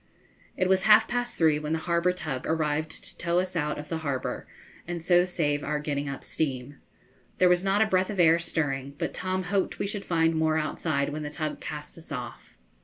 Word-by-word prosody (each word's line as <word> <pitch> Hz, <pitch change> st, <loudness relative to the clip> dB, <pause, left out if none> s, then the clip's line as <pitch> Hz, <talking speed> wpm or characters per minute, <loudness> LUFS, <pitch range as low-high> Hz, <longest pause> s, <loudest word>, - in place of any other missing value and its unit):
It 185 Hz, -, +2 dB
was 190 Hz, 0 st, +3 dB
half 215 Hz, +1 st, +7 dB
past 245 Hz, 0 st, -2 dB
three 155 Hz, -3 st, +4 dB
when 150 Hz, +1 st, -2 dB
the -, -, +2 dB
harbour 170 Hz, +1 st, +2 dB
tug 150 Hz, -8 st, -4 dB
arrived 155 Hz, -1 st, -1 dB
to -, -, -12 dB
tow 170 Hz, 0 st, +1 dB
us 185 Hz, 0 st, 0 dB
out 150 Hz, -2 st, 0 dB
of 150 Hz, 0 st, -8 dB
the 165 Hz, -, -2 dB
harbour 140 Hz, -5 st, -3 dB, 0.4 s
and 175 Hz, -2 st, -4 dB
so 175 Hz, 0 st, +5 dB
save 150 Hz, -5 st, 0 dB
our 150 Hz, +1 st, -1 dB
getting 145 Hz, -1 st, -2 dB
up 140 Hz, -, -6 dB
steam. 135 Hz, -2 st, -3 dB, 0.6 s
There 185 Hz, -, +5 dB
was 180 Hz, 0 st, +4 dB
not 195 Hz, +2 st, +3 dB
a -, -, +2 dB
breath 185 Hz, -3 st, +1 dB
of 205 Hz, -3 st, -4 dB
air 165 Hz, -1 st, +6 dB
stirring, 140 Hz, -5 st, -2 dB
but -, -, -2 dB
Tom 185 Hz, 0 st, -2 dB
hoped 190 Hz, +1 st, 0 dB
we -, -, -1 dB
should 200 Hz, 0 st, -3 dB
find 165 Hz, -1 st, +2 dB
more 160 Hz, 0 st, +2 dB
outside 155 Hz, -2 st, 0 dB
when 150 Hz, +1 st, -4 dB
the 150 Hz, -, -4 dB
tug 155 Hz, +1 st, -4 dB
cast 150 Hz, +2 st, -7 dB
us 160 Hz, -, -13 dB
off. 125 Hz, -3 st, -7 dB
160 Hz, 215 wpm, -27 LUFS, 150-180 Hz, 0.6 s, half